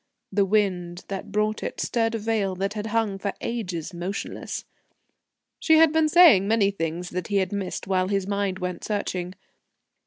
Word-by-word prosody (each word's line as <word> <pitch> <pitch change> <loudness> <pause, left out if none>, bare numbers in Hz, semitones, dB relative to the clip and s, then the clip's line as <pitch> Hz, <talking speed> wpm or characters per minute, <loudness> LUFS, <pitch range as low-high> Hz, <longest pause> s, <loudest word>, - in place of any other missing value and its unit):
The 200 0 +2
wind 185 -4 0
that 195 -1 -5
brought 215 +1 0
it - - -5
stirred 230 -1 0
a - - 0
veil 210 -3 -1
that 195 +2 -2
had 210 0 -4
hung 215 -3 0
for 200 0 -2
ages 190 -8 -4
motionless.... 180 +4 -5 0.9
She 320 -1 +5
had 320 -1 +6
been 320 -1 +3
saying 300 - +7
many 210 -2 +3
things 170 -1 -4
that 180 -2 -3
he 205 - -2
had 190 -2 0
missed 195 -2 -3
while 185 -1 +1
his 195 -1 0
mind 200 -1 -1
went 180 -1 -4
searching. 185 -3 -3
200 Hz, 175 wpm, -25 LUFS, 185-220 Hz, 0.9 s, saying